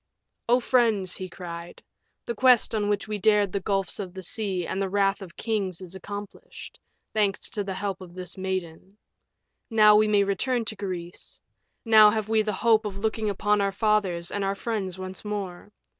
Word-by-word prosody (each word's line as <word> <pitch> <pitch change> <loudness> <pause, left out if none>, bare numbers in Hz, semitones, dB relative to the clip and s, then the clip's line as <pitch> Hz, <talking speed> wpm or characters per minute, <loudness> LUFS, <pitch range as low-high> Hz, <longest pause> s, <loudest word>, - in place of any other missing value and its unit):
"O 245 +1 +5
friends," 225 -7 +2
he 185 -1 -6
cried, 175 -1 -9 0.4
"the 235 - -2
quest 250 0 +4
on 205 -2 0
which 205 +1 -1
we 210 -1 -3
dared 205 -1 +3
the 200 - -1
gulfs 195 0 -1
of 190 -2 -6
the 190 - -7
sea 190 -2 -1
and 190 - -3
the 195 - -1
wrath 200 0 +1
of 180 -3 -11
kings 200 -6 -2
is 185 -2 -9
accomplished, 205 +1 -9 0.3
thanks 205 -3 +1
to 210 - -2
the 195 -1 -4
help 195 -1 -3
of 175 -1 -11
this 180 -1 -7
maiden. 190 0 -5 0.7
Now 215 -2 +6
may 215 0 +4
we 205 -1 +4
return 230 +5 0
to 215 - -4
Greece; 180 -3 -6 0.5
now 215 -2 +8
have 215 0 -2
we 220 -1 +3
the 215 0 -1
hope 220 +2 +3
of 205 -2 -5
looking 220 +1 -1
upon 205 +1 +1
our 200 0 +1
fathers 195 -5 0
and 205 - -2
our 195 0 0
friends 195 -4 -3
once 185 0 -7
more. 205 -2 -5
200 Hz, 190 wpm, -26 LUFS, 185-215 Hz, 0.7 s, now